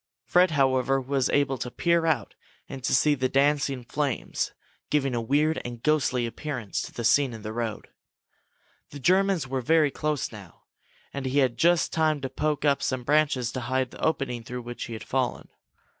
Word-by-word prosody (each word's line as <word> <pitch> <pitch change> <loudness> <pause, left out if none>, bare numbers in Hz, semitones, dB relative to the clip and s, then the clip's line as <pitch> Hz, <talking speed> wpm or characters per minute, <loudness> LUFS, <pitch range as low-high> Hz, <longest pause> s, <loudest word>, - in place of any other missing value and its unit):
Fred, 180 +1 +4
however, 135 -2 +2
was 135 0 0
able 135 -2 +1
to 125 - -3
peer 170 +5 +1
out 155 -7 0 0.3
and 135 -2 -8
to - - +3
see 150 +3 +4
the 130 -2 0
dancing 140 -1 +1
flames, 135 +1 -2 0.4
giving 135 -3 +1
a 120 - 0
weird 150 +6 +1
and 120 -1 -7
ghostly 135 -5 +2
appearance 120 -3 -4
to - - -7
the 120 - -6
scene 135 +2 +3
in 110 -2 -9
the 110 0 -5
road. 115 -2 -4 1.0
The 145 - -9
Germans 185 0 +2
were 130 0 -2
very 155 +2 +3
close 150 -1 -2
now 100 -6 -13 0.5
and 140 -1 -3
he 130 +2 -1
had 130 -4 +3
just 175 0 +2
time 155 -2 +2
to 130 - -3
poke 150 +1 -1
up 140 -1 +3
some 130 -2 -1
branches 145 -4 +2
to 130 - -4
hide 130 +1 -1
the - - -10
opening 135 -7 -1
through 125 +2 -6
which 120 0 -6
he 115 - -7
had 110 - -7
fallen. 130 -2 -2
135 Hz, 190 wpm, -26 LUFS, 125-150 Hz, 1.0 s, Fred